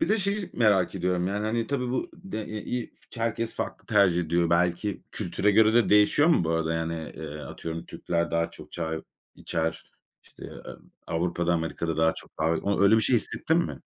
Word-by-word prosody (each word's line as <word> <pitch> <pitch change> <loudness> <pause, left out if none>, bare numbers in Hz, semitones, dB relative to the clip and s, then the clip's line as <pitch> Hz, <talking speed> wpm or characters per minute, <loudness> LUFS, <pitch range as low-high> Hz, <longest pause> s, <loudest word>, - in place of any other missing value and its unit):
Bir 325 - +1
de 220 - +3
şeyi 200 -1 -1
merak 105 -6 +3
ediyorum: 90 -1 0
Yani 105 +2 -2
hani 115 +1 -1
tabii 125 -2 -2
bu 130 - -2
de 180 - -6
e 110 +1 -6
i 125 -1 -4 0.2
f 115 - -9
herkes 115 0 -1
farklı - - -5
tercih 100 -5 +4
ediyor. 85 0 +1
Belki 90 +4 +1
kültüre 105 +1 0
göre 110 +2 +5
de 120 - +4
değişiyor 105 +10 +5
mu 160 - +4
bu 80 - -1
arada 80 0 0
yani? 80 -1 -3
Eee, 75 +1 -7
atıyorum 80 +2 -6
Türkler 85 -1 -2
daha 85 0 0
çok - - -13
çay 80 -1 -3 0.3
içer, 80 0 -3 0.3
işte, - - -15
eee, - - -9 0.4
Avrupa'da, 85 +1 0
Amerika'da 80 -1 -2
daha 80 0 +3
çok - - -10
daha 80 +1 +2
oy 100 +4 0
öyle 110 +3 +6
bir - - +4
şey 125 - +4
hissettin 160 +8 +1
mi? 175 - -2
90 Hz, 200 wpm, -27 LUFS, 85-115 Hz, 0.4 s, öyle